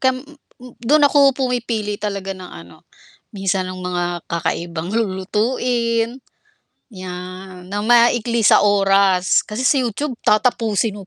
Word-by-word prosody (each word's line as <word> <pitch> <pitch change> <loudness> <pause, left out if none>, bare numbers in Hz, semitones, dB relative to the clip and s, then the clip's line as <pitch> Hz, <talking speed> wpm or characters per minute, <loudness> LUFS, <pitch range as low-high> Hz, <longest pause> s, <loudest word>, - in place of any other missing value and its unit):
kam 260 0 0 0.6
dun 290 +6 +3
ako 280 -2 +4
pumipili 235 -5 -2
talaga 200 -2 -3
ng 185 -1 -10
ano, 85 +1 -14 0.4
minsan 195 -2 -1
ng 185 - -8
mga 180 -1 -2 0.2
kakaibang 170 +1 -3
lulutuin, 230 +3 -1 0.7
yan, 185 -1 -9
na 205 - -3
maikli 235 +1 +3
sa 210 - +5
oras, 195 -2 +3
kasi 215 +4 -4
sa 265 +2 +3
YouTube 250 +2 -3
tatapusin 215 -2 +1
mo 195 - -11
210 Hz, 120 wpm, -19 LUFS, 185-240 Hz, 0.7 s, sa